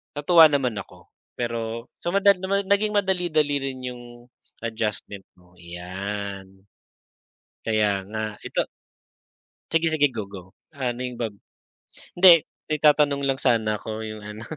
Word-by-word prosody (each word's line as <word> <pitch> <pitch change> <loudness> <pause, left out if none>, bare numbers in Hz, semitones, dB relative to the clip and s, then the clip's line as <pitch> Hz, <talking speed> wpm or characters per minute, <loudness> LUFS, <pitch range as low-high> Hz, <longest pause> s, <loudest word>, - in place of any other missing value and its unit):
natuwa 160 +2 +7
naman 130 -7 0
ako - - -13 0.2
pero 115 0 -4
sa 175 +3 -2
madali 200 -1 +5
naman 200 +1 0
naging 210 +1 +2
madali 190 -3 +1
dali 150 -3 +1
rin 135 -1 -4
yung 125 -1 -6 0.6
adjustment 105 -3 -3
ko, 90 0 -24
'yan. 95 +2 -6 1.0
Kaya 110 -2 +2 0.2
nga, 110 +1 -4 0.2
ito - - 0 1.1
Sige-sige, 160 -3 +3
go-go, 100 -2 -8 0.2
ano 125 -3 -3
yung 125 -1 -6
ba 115 - 0 0.9
hindi 175 -3 +7 0.2
may 155 -1 -1
itatanong 145 -1 +4
lang 135 -1 0
sana 110 -4 +2
ako 110 +1 -5
yung 110 -1 -7
ano. 105 +1 -8
120 Hz, 130 wpm, -24 LUFS, 105-155 Hz, 1.1 s, natuwa